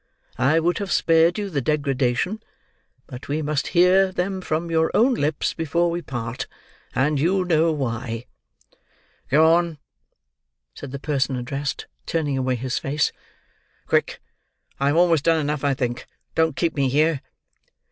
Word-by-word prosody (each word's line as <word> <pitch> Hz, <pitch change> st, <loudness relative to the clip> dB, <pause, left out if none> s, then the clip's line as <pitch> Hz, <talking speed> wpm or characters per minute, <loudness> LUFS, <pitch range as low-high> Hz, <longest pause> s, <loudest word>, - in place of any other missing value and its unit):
I 140 Hz, +6 st, +4 dB
would 170 Hz, +1 st, 0 dB
have 200 Hz, -2 st, -4 dB
spared 165 Hz, +1 st, +3 dB
you 205 Hz, -2 st, -3 dB
the 140 Hz, -4 st, -1 dB
degradation, 140 Hz, -, 0 dB, 0.6 s
but 125 Hz, -3 st, -10 dB
we 150 Hz, +2 st, -1 dB
must 150 Hz, -1 st, -1 dB
hear 185 Hz, +2 st, +5 dB
them 185 Hz, +1 st, -2 dB
from 165 Hz, 0 st, -2 dB
your 160 Hz, 0 st, +2 dB
own 250 Hz, +4 st, +4 dB
lips 150 Hz, -8 st, -1 dB
before 170 Hz, +2 st, 0 dB
we 170 Hz, +1 st, -2 dB
part, 120 Hz, -5 st, -5 dB, 0.5 s
and 140 Hz, +3 st, +2 dB
you 180 Hz, +5 st, +2 dB
know 165 Hz, -1 st, +3 dB
why." 120 Hz, -4 st, -3 dB, 1.0 s
"Go 160 Hz, +4 st, +5 dB
on," 170 Hz, -2 st, +1 dB, 1.0 s
said 140 Hz, -, -9 dB
the 140 Hz, -, -4 dB
person 135 Hz, -2 st, -1 dB
addressed, 135 Hz, +3 st, -4 dB, 0.2 s
turning 150 Hz, -4 st, -1 dB
away 130 Hz, -1 st, 0 dB
his 125 Hz, +1 st, -2 dB
face. 145 Hz, +2 st, 0 dB, 0.7 s
"Quick. -, -, 0 dB, 0.6 s
I 140 Hz, -, +1 dB
have 145 Hz, -, +2 dB
almost 170 Hz, -4 st, +4 dB
done 165 Hz, -1 st, +3 dB
enough, 150 Hz, -1 st, -2 dB
I 140 Hz, -1 st, +2 dB
think. 125 Hz, -2 st, -3 dB, 0.3 s
Don't 160 Hz, -3 st, +1 dB
keep 170 Hz, +1 st, 0 dB
me 140 Hz, -2 st, +1 dB
here." 150 Hz, +1 st, +2 dB
150 Hz, 150 wpm, -23 LUFS, 135-170 Hz, 1.0 s, hear